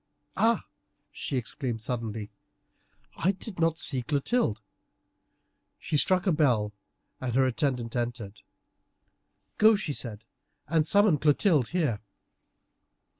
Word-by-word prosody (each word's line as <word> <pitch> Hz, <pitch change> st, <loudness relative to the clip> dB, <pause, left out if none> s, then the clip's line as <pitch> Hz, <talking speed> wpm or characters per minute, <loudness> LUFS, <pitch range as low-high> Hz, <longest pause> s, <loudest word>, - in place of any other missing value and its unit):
"Ah!" 225 Hz, +3 st, +2 dB, 0.5 s
she 135 Hz, -, -4 dB
exclaimed 120 Hz, 0 st, -3 dB
suddenly. 110 Hz, -2 st, -4 dB, 0.9 s
"I 190 Hz, +3 st, +2 dB
did 190 Hz, -1 st, -9 dB
not 165 Hz, -1 st, +2 dB
see 135 Hz, -5 st, +1 dB
Clotilde." 140 Hz, -, 0 dB, 1.2 s
She -, -, -4 dB
struck 185 Hz, +5 st, +3 dB
a 190 Hz, -, +3 dB
bell, 125 Hz, -10 st, +2 dB, 0.5 s
and 125 Hz, -2 st, -3 dB
her 135 Hz, 0 st, +4 dB
attendant 125 Hz, -3 st, -1 dB
entered. 120 Hz, -4 st, -4 dB, 1.2 s
"Go," 220 Hz, +1 st, +7 dB
she 180 Hz, -8 st, -3 dB
said, 110 Hz, -5 st, -5 dB, 0.4 s
"and 155 Hz, 0 st, +2 dB
summon 200 Hz, -7 st, +4 dB
Clotilde 150 Hz, -, +3 dB
here." 150 Hz, -12 st, 0 dB
140 Hz, 110 wpm, -28 LUFS, 115-170 Hz, 1.2 s, Go